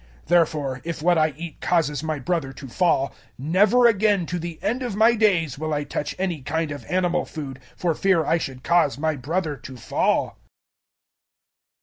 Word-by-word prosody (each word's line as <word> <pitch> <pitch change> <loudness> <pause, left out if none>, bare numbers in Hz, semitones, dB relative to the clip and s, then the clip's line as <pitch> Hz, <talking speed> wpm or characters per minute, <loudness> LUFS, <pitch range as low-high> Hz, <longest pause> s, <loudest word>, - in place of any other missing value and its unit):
008:013 - - -29
Therefore 150 -6 +1
if 165 -2 -5
what 175 0 +4
I 155 0 +3
eat 165 0 -8
causes 150 -5 +1
my 155 -1 -2
brother 145 -1 -2
to 135 +1 -10
fall, 140 0 +1 0.2
never 195 - +3
again 205 -4 +3
to 180 +2 -3
the 170 -1 -6
end 245 +4 0
of 240 -6 -3
my 225 +3 +5
days 180 - +1
will 155 -1 -1
I 145 - -1
touch 145 0 -4
any 180 -5 -2
kind 155 +3 -2
of 145 -5 -7
animal 180 -1 0
food, 135 -4 -7 0.2
for 175 -2 0
fear 180 -1 +2
I 165 - +2
should 130 -4 -6
cause 170 -6 +2
my 155 +1 0
brother 155 +4 -2
to 130 -1 -10
fall. - - 0
165 Hz, 185 wpm, -23 LUFS, 145-180 Hz, 0.2 s, my